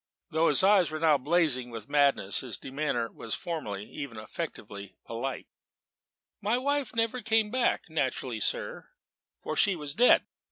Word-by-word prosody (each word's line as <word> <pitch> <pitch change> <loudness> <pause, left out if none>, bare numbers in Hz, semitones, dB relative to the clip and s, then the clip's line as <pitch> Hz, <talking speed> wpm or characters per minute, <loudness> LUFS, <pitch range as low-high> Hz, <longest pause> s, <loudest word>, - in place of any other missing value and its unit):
Though 160 +1 +2
his 145 - +5
eyes 190 -5 +5
were 155 0 -4
now 155 -3 +4
blazing 145 -4 +1
with 115 -2 -8
madness, 140 -9 +3
his 120 -6 -1
demeanour 135 -4 -2
was 115 - -5
formally, 105 - -5
even 140 -7 -7
affectedly, 100 -1 -7
polite. 120 +3 -4 1.0
"My 215 +4 +1
wife 280 -2 -1
never 230 +2 0
came 220 -1 +1
back: 255 -1 0
naturally, - - -2
sir - - -3 0.6
for - - -3
she 200 -2 +3
was 150 -3 -5
dead." 245 +9 +5
150 Hz, 150 wpm, -28 LUFS, -, 1.0 s, his